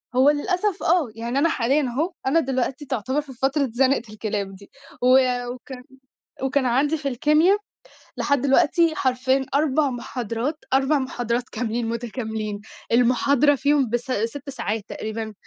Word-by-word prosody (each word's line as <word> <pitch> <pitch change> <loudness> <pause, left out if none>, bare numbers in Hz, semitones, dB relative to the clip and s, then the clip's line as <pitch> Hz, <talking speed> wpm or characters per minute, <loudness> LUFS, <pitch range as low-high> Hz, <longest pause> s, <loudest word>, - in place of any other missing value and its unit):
هو 265 +3 +6
للأسف 360 +6 0
آه، 330 -7 +2
يعني 235 +4 -2
أنا 330 +3 +3
حاليًا 275 +2 +1
أهه، 290 +8 -1
أنا 325 +5 +4
دلوقتي 270 0 -2
تعتبر 260 +3 -1
في 275 -2 -12
فترة 270 +2 0
زنقة 265 0 +3
الكلاب 205 -3 -3
دي، 200 +1 -15 0.3
و 250 - +2 0.5
وكان 250 0 -10 0.6
وكان 265 0 +1
عندي 285 +6 +2
في 280 -1 -3
الكيميا 305 - +3 0.6
لحد 285 -3 +1
دلوقتي 315 +4 +3
حرفيًا 260 0 +1
4 290 -1 +2
محاضرات، 245 +3 -3 0.2
4 270 +2 +3
محاضرات 245 -1 -2
كاملين 230 0 -2
متكاملين، 220 -3 -4 0.3
المحاضرة 260 +4 +4
فيهم 280 -3 +2
بس 240 +1 0
6 255 +5 -3
ساعات 220 -5 -3
تقريبًا 220 0 -5
260 Hz, 140 wpm, -23 LUFS, 235-290 Hz, 0.6 s, هو